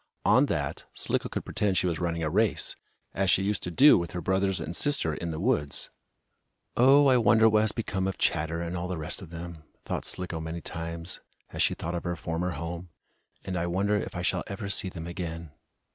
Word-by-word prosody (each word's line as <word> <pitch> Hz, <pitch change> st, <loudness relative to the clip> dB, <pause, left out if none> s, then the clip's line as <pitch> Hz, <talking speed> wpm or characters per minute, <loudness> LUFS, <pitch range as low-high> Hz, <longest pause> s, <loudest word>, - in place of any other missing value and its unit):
On -, -, +5 dB
that, -, -, -2 dB
Slicko -, -, -1 dB
could -, -, -4 dB
pretend 100 Hz, -3 st, 0 dB
she -, -, +2 dB
was 85 Hz, -3 st, 0 dB
running 85 Hz, -2 st, -1 dB
a 75 Hz, -, 0 dB
race, 105 Hz, +2 st, +1 dB, 0.4 s
as 95 Hz, -1 st, +1 dB
she 95 Hz, -, +4 dB
used 100 Hz, +1 st, 0 dB
to -, -, -4 dB
do 135 Hz, -, +7 dB
with 85 Hz, +1 st, -5 dB
her 90 Hz, -, -2 dB
brothers 95 Hz, +1 st, +1 dB
and 80 Hz, +1 st, -4 dB
sister 140 Hz, -, +2 dB
in 85 Hz, +2 st, -4 dB
the 80 Hz, -1 st, -4 dB
woods. 70 Hz, -1 st, 0 dB, 0.8 s
"Oh, 135 Hz, +4 st, +6 dB
I 130 Hz, -2 st, +6 dB
wonder 110 Hz, -1 st, +5 dB
what 110 Hz, -1 st, +4 dB
has 110 Hz, -1 st, +4 dB
become 95 Hz, -5 st, -2 dB
of 95 Hz, -, -3 dB
Chatter, 80 Hz, +2 st, 0 dB
and 85 Hz, +1 st, -4 dB
all 90 Hz, 0 st, -3 dB
the 90 Hz, -1 st, -3 dB
rest 80 Hz, +5 st, -3 dB
of 90 Hz, -, -10 dB
them," 85 Hz, -1 st, -8 dB, 0.2 s
thought -, -, -3 dB
Slicko 90 Hz, -3 st, -3 dB
many 80 Hz, +1 st, -4 dB
times, 85 Hz, +1 st, -4 dB, 0.3 s
as -, -, -2 dB
she -, -, +3 dB
thought 85 Hz, -, -4 dB
of 85 Hz, -, -3 dB
her 85 Hz, -1 st, -2 dB
former 85 Hz, +2 st, -2 dB
home. 85 Hz, +2 st, -5 dB, 0.6 s
"And 95 Hz, -, -3 dB
I 85 Hz, 0 st, -1 dB
wonder 100 Hz, +4 st, +1 dB
if 105 Hz, -, -3 dB
I 90 Hz, -, -3 dB
shall 90 Hz, 0 st, 0 dB
ever 100 Hz, 0 st, -5 dB
see 95 Hz, -1 st, +1 dB
them 80 Hz, -2 st, -7 dB
again!" 85 Hz, -2 st, -5 dB
90 Hz, 220 wpm, -28 LUFS, 85-100 Hz, 0.8 s, do